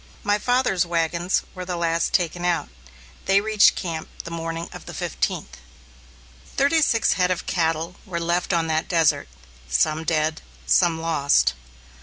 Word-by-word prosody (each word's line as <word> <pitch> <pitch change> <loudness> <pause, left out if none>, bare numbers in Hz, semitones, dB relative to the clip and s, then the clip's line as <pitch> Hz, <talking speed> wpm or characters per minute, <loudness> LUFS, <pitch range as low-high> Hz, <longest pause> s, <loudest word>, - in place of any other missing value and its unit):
My 205 0 +1
father's 245 -6 +2
wagons 170 +1 0
were 185 - -6
the 180 0 -4
last 170 -1 0
taken 175 -1 0
out. 175 -1 0 0.6
They 195 +1 +4
reached 215 0 +4
camp 165 -4 -4 0.2
the 170 - -8
morning 165 0 -4
of - - -11
the - - -7
fifteenth. 65 +1 -3 1.0
Thirty 285 +4 +3
six 230 -6 +3
head 180 -1 +1
of 180 -1 -2
cattle 165 0 -1
were 175 -2 -3
left 170 +2 0
on 170 -2 +1
that 160 0 -1
desert, 165 -3 +2 0.4
some 155 - +1
dead, 155 -1 0 0.2
some 170 -3 +3
lost. 150 - +2
170 Hz, 150 wpm, -23 LUFS, 160-185 Hz, 1.0 s, They